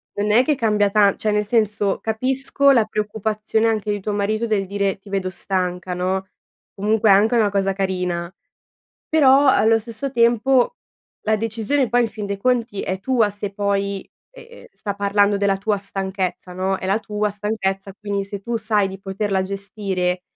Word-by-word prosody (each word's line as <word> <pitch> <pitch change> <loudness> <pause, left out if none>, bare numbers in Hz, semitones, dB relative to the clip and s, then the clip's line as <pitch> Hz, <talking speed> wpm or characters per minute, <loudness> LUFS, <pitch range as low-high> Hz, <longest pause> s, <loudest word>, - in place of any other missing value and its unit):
non 205 +1 0
è 240 +4 +5
che 300 +1 +1
cambia 210 -4 +2
tan 200 -1 +4
cioè, 215 - -2
nel 210 0 +1
senso, 210 -3 +1
capisco 265 +5 +2
la 230 -5 +4
preoccupazione 215 +1 -1
anche 215 -2 0
di 205 - -2
tuo 210 +2 -3
marito 215 +3 -1
del 205 -3 0
dire: 200 0 -1
"Ti 195 +1 -16
vedo 195 -2 -1
stanca." 180 -1 -3
No? 185 +2 -1 0.5
Comunque 210 +1 +2
è - - +9
anche 215 +5 +4
una 215 -3 +3
cosa 195 -1 +1
carina, 180 -2 -2 0.8
però 280 -2 +5
allo 225 -2 +4
stesso 230 +5 -6
tempo 240 - +3 0.5
la 220 0 +3
decisione 225 +4 -1
poi 245 +2 +3
in 230 - 0
fin 215 -1 -6
dei 200 0 -3
conti 235 -2 0
è 190 0 -3
tua, 230 -2 +2
se 205 0 -5
poi, 200 -1 -2 0.2
ehm, 485 -1 -14
sta 200 -2 -5
parlando 200 0 +2
della 200 -1 +1
tua 205 +1 0
stanchezza, 190 -2 -4
no, 190 +1 -1
è 185 - -7
la 195 +3 +1
tua 210 -1 -2
stanchezza. 200 -2 -3
Quindi 200 -1 -2
se 200 0 -7
tu 235 +3 -3
sai 215 -3 +1
di 190 0 -8
poterla 195 0 -2
gestire, 190 -2 -3
205 Hz, 175 wpm, -21 LUFS, 195-220 Hz, 0.8 s, è